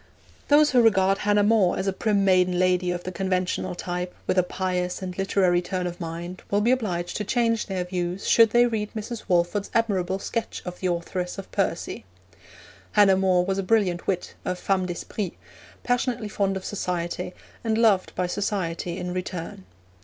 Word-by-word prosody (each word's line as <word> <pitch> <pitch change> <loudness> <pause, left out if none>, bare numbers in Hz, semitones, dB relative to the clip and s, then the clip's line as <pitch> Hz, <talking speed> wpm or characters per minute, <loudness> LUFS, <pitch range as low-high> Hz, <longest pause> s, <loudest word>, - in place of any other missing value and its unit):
Those 295 +1 +5
who 250 -3 +5
regard 195 -3 +4
Hannah 205 0 +3
More 205 -4 +3
as - - -2
a 195 - 0
prim 200 -1 +1
maiden 185 -1 +3
lady 180 0 +2
of 175 0 -2
the 185 - -4
conventional 185 -1 -1
type, 180 0 -4
with - - 0
a 185 - +5
pious 180 0 -2
and 180 -1 -5
literary 185 -2 +2
turn 180 0 -3
of 175 0 -5
mind, 170 +2 -6
will 200 - +2
be 225 +4 +3
obliged 180 -9 -1
to 210 - -2
change 230 +1 +1
their 190 -3 -2
views 180 +1 -3
should 230 -1 +6
they 240 +2 +5
read 215 -3 -2
Mrs. 220 +1 -5
Walford's 180 +2 +1
admirable 195 -5 +1
sketch 225 +3 -4
of 180 0 -6
the 185 - -1
authoress 180 +1 -3
of 195 - -8
Percy. - - -2 0.9
Hannah 205 -2 +6
More 185 -2 +3
was 195 +1 -1
a - - +2
brilliant 185 -3 +1
wit, 185 -2 -1
a 185 - -1
femme 185 0 0
d'esprit, 180 +2 -4 0.5
passionately 245 -3 0
fond 195 -2 0
of 190 - -8
society, 180 -2 -3 0.3
and 220 -1 0
loved 215 -5 +3
by 185 - 0
society 180 -3 -2
in 180 -1 -4
return. 180 - -5
185 Hz, 180 wpm, -25 LUFS, 180-210 Hz, 0.9 s, should